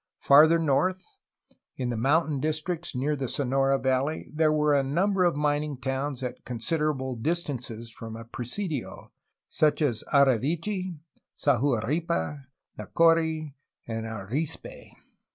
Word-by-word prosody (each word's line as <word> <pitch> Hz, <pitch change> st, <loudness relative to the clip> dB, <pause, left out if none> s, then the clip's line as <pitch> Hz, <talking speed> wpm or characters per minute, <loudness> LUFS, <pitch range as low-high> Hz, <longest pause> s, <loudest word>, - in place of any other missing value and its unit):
Farther 155 Hz, +4 st, +6 dB
north, 165 Hz, +4 st, +1 dB, 0.7 s
in 125 Hz, -2 st, -2 dB
the 120 Hz, -, -2 dB
mountain 145 Hz, +5 st, +1 dB
districts 155 Hz, +2 st, -2 dB
near 145 Hz, +4 st, 0 dB
the 135 Hz, -2 st, -3 dB
Sonora 135 Hz, +1 st, +1 dB
valley, 130 Hz, +3 st, -1 dB
there 155 Hz, 0 st, +3 dB
were 150 Hz, -1 st, +2 dB
a 140 Hz, -, +4 dB
number 185 Hz, +8 st, +1 dB
of 175 Hz, -, +2 dB
mining 150 Hz, -1 st, 0 dB
towns 135 Hz, +1 st, -3 dB
at 125 Hz, -, -5 dB
considerable 130 Hz, +1 st, -1 dB
dis 165 Hz, +9 st, -1 dB
tances 120 Hz, -5 st, -6 dB
from 115 Hz, -1 st, -8 dB
a 115 Hz, 0 st, -9 dB
presidio, 130 Hz, -, -5 dB, 0.4 s
such 155 Hz, -1 st, +2 dB
as 130 Hz, -8 st, 0 dB
Ari 140 Hz, -5 st, +5 dB
vechi, 175 Hz, -, -2 dB, 0.4 s
Sahuaripa, 135 Hz, -, 0 dB, 0.3 s
Nacori, 160 Hz, -3 st, +2 dB, 0.3 s
and 115 Hz, -1 st, -4 dB
Arispe. 110 Hz, +8 st, -4 dB
145 Hz, 125 wpm, -27 LUFS, 130-160 Hz, 0.7 s, Farther